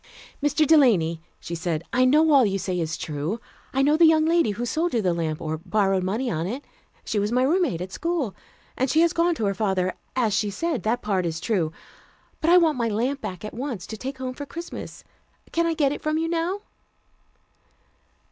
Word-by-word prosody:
"Mr. 290 +1 +2
Delany," 210 - +4 0.2
she 170 - -7
said, 165 -1 -2
"I 255 +1 +4
know 305 +4 +5
all 275 -3 +7
you 195 -3 +1
say 185 -2 -2
is 165 -1 -2
true. 155 +8 -3 0.3
I 270 - +1
know 295 +2 +4
the 335 0 +7
young 315 -1 +4
lady 335 -6 +3
who 235 +4 -2
sold 320 +5 -1
you 230 - +2
the 180 -2 +2
lamp, 160 -2 -2
or 155 -1 -3
borrowed 195 +1 +1
money 215 +8 -1
on 165 +1 -2
it. 255 +8 -5 0.4
She 210 - -1
was 205 +2 0
my 250 +1 +2
roommate 305 - +1
at 185 +1 -5
school, 330 - -2 0.4
and 260 +1 0
she 315 - +4
has 340 0 +3
gone 340 0 +2
to 225 - -2
her 200 - +1
father, 190 -2 0 0.2
as 235 -5 +1
she 205 +1 +1
said. 290 - -2
That 230 +5 -1
part 190 -4 0
is 165 0 -3
true. 175 -5 0 0.7
But 325 - +1
I 355 - +8
want 320 -6 +3
my 235 - +1
lamp 250 +6 -1
back 185 +2 -6
at 215 - -7
once, 240 -7 -4
to 220 - -7
take 265 +5 -6
home 255 0 -4
for 285 +2 -7
Christmas. 335 +3 -8 0.5
Can 335 0 +1
I 330 - 0
get 285 -3 +2
it 290 - -4
from 310 0 0
you 325 +1 0
now?" 340 +4 -1
240 Hz, 215 wpm, -24 LUFS, 190-310 Hz, 0.7 s, I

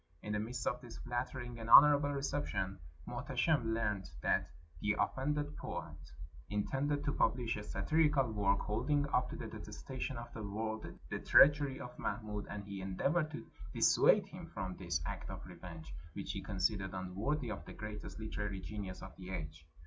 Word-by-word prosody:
In 105 - -3
the 105 - +1
midst 115 +4 -3
of 125 - 0
this 120 -3 -9
flattering 120 0 -3
and 115 0 -5
honorable 145 +2 +9
reception 135 -9 -1 0.3
Muhteshim 140 -9 +1
learned 105 -4 -1
that - - +2 0.3
the 105 +6 +1
offended 145 +2 0
poet 75 - -5 0.5
intended 135 +8 0
to 145 - +2
publish 120 0 +2
a 105 - -4
satirical 140 +5 +2
work, 100 -2 +2
hold 105 +7 -2
ing 145 -1 +4
up 125 - +3
to - - -5
the - - -5
detestation 130 0 -5
of 120 0 -7
the 110 - -5
world 110 +2 -3 0.2
the - - -1
treachery 145 -1 +6
of 125 - -8
Mahmud, 105 -3 -3
and 105 - -5
he 100 -1 -6
endeavored 140 - +1
to 155 - -7 0.3
dissuade - - +6
him - - -9
from 95 -2 -4
this 85 -5 -2
act - - -4
of - - -7
revenge, 85 -3 -9 0.2
which - - -4
he - - -4
considered 95 -1 0
unworthy 110 +9 -1
of 100 -7 -5
the - - -8
greatest 105 -1 -6
hterary 105 -2 -3
genius 100 -4 -5
of 95 0 -9
the 95 -1 -8
age. 80 -4 -6
110 Hz, 170 wpm, -35 LUFS, 95-135 Hz, 0.5 s, honorable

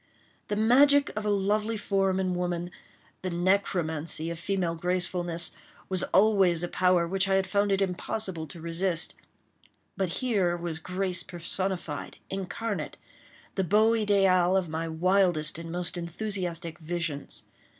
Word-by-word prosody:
The 205 - -1
magic 280 +6 +5
of 210 0 -3
a - - +2
lovely 210 +2 +1
form 195 -2 +1
in 185 -1 0
woman—the 175 +1 -5
necromancy 170 -3 0
of 170 - -6
female 185 -3 -1
gracefulness—was 175 +1 -1
always 190 -4 +4
a - - 0
power 180 -1 +2
which 190 +2 +1
I 195 - +3
had 190 0 +2
found 200 +1 +1
it 195 0 +3
impossible 180 -2 -2
to 160 +4 -10
resist, 170 +1 0 0.8
but 190 -2 -1
here 190 -6 0
was 170 -2 -4
grace 185 +1 -1
personified, 175 -2 -3
incarnate, 195 +3 -4 0.6
the 190 - 0
beau 215 +5 +4
ideal 195 -4 +3
of 185 -2 0
my 160 +1 -3
wildest 170 -1 +1
and 165 0 -7
most 175 +1 0
enthusiastic 175 -2 -4
visions. 160 -3 -4
185 Hz, 130 wpm, -28 LUFS, 170-195 Hz, 0.8 s, magic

